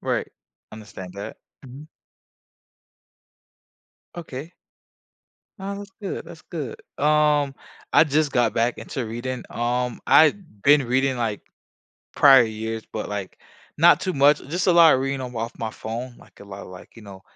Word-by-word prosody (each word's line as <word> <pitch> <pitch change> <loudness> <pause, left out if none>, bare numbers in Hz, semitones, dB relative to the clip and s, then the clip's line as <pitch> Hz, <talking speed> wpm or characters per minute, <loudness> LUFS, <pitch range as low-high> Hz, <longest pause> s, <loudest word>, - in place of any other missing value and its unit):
right, - - -2 0.4
understand 100 -4 -10
that, 100 +1 -7 0.3
mhm. 135 +4 -11 2.3
Okay. 160 -1 -8 1.0
Oh, 200 +1 -5
that's 200 -1 -10
good 195 - -5
that's 160 - -12
good, 145 -9 -5 0.3
um, 150 -2 +3 0.4
I - - +6
just 150 0 +1
got 120 -4 +1
back 115 +1 0
into 125 -5 -5
reading, 120 +3 -5
um, 120 +1 -2
I'd 155 - +3
been 145 0 +5
reading, 130 +1 +1
like, 110 -4 -2 0.8
prior 135 -3 +7
years, 110 0 -5
but, 110 - -4
like, 100 -2 -6 0.4
not 175 +1 +6
too 185 -2 -2
much. 140 +2 +5
Just 175 +5 -2
a - - +6
lot 165 -3 +7
of 130 - +2
reading 135 0 -2
on 125 -1 -7
off 115 +1 -4
my 110 -1 -4
phone, 120 +3 -7
like, - - -20
a - - -11
lot 100 0 -10
of - - -10
like, 90 0 -12
you 115 - -13
know, 100 -2 -12
130 Hz, 155 wpm, -23 LUFS, 110-150 Hz, 2.3 s, prior